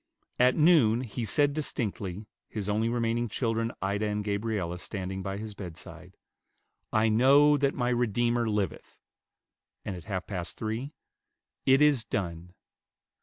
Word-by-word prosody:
At 125 +1 +5
noon 150 -9 +5
he 120 -1 -5
said 145 +8 +2
distinctly, 105 - -3 0.2
his 105 -3 -4
only 110 +2 +1
remaining 120 0 0
children, 115 0 -1
Ida 100 +2 0
and 105 0 -2
Gabriella, 100 -4 -2
standing 95 0 -5
by 95 +1 -4
his 110 0 -6
bedside, 90 -5 -10 0.7
"I 110 +1 +3
know 140 +7 +5
that 140 0 +1
my 120 -2 0
Redeemer 120 0 +1
liveth;" 105 -5 -3 0.8
and 95 - -3
at 85 -2 -10
half 95 -3 -3
past 90 -4 -5
three, 115 +6 -3 0.8
"It 135 +2 +6
is 145 -6 +4
done." 90 -4 -4
110 Hz, 135 wpm, -28 LUFS, 100-120 Hz, 0.8 s, It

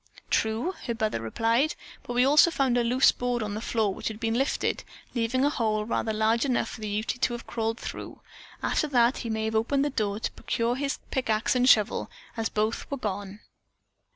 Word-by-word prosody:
"True!" 225 +11 +1
her 235 - -1
brother 215 - -1
replied, 230 - +1 0.3
"but 255 -3 -6
we 250 +1 +4
also 300 +5 +6
found 270 -6 +1
a 240 - +3
loose 250 +3 +5
board 245 -2 -2
on 210 -1 -3
the 215 - -4
floor, 220 -4 0
which - - -5
had 220 -1 -4
been 225 -1 0
lifted, 270 +4 0 0.3
leaving 250 +3 +1
a 290 - +2
hole 215 -5 0
large 220 0 +1
enough 255 -4 0
for - - -9
the 215 - -3
Ute 215 +4 -2
to 240 - +2
have 240 - -6
crawled 225 -1 -2
through. - - -7 0.4
After 305 - +1
that 245 -2 +3
he 230 - -5
may 220 0 -1
have 220 - -2
opened 275 +6 +2
the 290 - -1
door 210 -4 -1
to - - -2
procure 235 +1 -1
his 275 +1 -2
pick 260 -3 -1
ax 215 +1 +2
and 250 +1 +4
shovel, 210 -4 +3 0.3
as 225 -1 -1
both 215 +2 -1
were 280 - -2
gone." 205 -3 -5
230 Hz, 210 wpm, -27 LUFS, 220-255 Hz, 0.4 s, also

